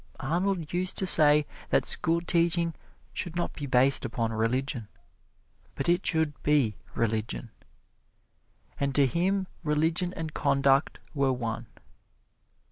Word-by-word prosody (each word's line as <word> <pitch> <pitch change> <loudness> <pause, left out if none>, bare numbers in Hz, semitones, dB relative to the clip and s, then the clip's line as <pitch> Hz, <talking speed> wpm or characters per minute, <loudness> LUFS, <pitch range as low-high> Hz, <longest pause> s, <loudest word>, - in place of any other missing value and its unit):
Arnold 170 +3 -1
used 180 +1 -1
to 190 - 0
say 150 -4 +5 0.2
that - - +2
schoolteaching 170 0 +2 0.4
should 175 -2 -5
not 175 - -2
be 145 - -6
based 130 +1 +4
upon 115 -2 -2
religion, 115 +1 -1 0.9
but 135 - -1
it 175 +2 +2
should 160 -3 0
be 140 -8 +2 0.2
religion. 110 0 -2 1.3
And 140 -1 -1
to 140 - +5
him 190 +8 0 0.2
religion 160 +4 +1
and 160 -1 -5
conduct 140 0 +2 0.2
were 140 -3 +1
one. 115 -1 -4
150 Hz, 120 wpm, -27 LUFS, 130-170 Hz, 1.3 s, say